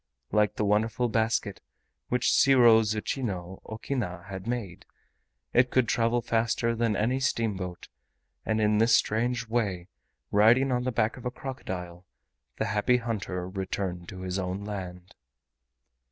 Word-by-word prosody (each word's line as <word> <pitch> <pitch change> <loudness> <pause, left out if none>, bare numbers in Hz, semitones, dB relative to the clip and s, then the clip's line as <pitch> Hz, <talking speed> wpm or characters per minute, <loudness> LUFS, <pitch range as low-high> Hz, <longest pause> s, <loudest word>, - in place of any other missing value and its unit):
Like 105 0 +2
the 105 - 0
wonderful 110 +3 +1
basket 110 -2 0 0.5
which 125 0 0
Shiwozuchino 110 -6 +3
Okina 110 -6 -4
had 95 +1 -7
made, 115 -7 -4 0.7
it 125 +1 +4
could 130 -2 +2
travel 115 +1 +1
faster 115 0 +1
than 115 -2 +1
any 125 +6 +1
steamboat, 100 -9 -2 0.6
and 110 0 0
in 105 0 +3
this 115 +1 +5
strange 115 +2 0
way, 100 -6 -1 0.4
riding 120 +6 +5
on 125 0 0
the 130 - 0
back 110 0 0
of 125 - -11
a - - 0
crocodile, 90 -10 -7 0.5
the - - 0
Happy 105 +5 +2
Hunter 95 -6 -3
returned 95 -2 -4
to 95 - -8
his 95 +1 -3
own 95 +2 -3
land. 95 -3 -7
110 Hz, 135 wpm, -28 LUFS, 95-120 Hz, 0.7 s, this